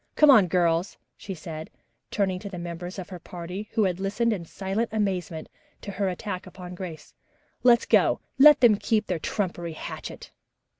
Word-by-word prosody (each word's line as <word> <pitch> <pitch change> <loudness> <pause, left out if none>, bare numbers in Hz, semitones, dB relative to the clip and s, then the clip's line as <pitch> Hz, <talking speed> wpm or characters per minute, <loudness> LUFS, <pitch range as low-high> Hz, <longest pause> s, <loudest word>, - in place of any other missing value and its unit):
Come 300 -2 +7
on, 210 -8 +7
girls," 170 -3 +1 0.2
she 195 - -7
said, 160 -1 -7 0.4
turning 190 -3 0
to 200 - -7
the 185 - -7
members 175 +2 -6
of 185 -2 -7
her 180 -2 -8
party, 180 +5 -7
who 225 - +3
had 185 -2 0
listened 205 +4 0
in 175 -5 -5
silent 195 +6 -2
amazement 185 -7 -2 0.3
to 200 - -6
her 195 0 -1
attack 185 +1 -5
upon 180 -1 -9
Grace. 170 -4 -8 0.5
"Let 240 -2 +6
us - - -7
go. - - +3 0.2
Let 295 +1 +8
them 230 -4 +6
keep 215 0 0
their 180 -3 -2
trumpery 175 -2 -3
hatchet." - - -8
185 Hz, 180 wpm, -26 LUFS, 175-210 Hz, 0.5 s, Let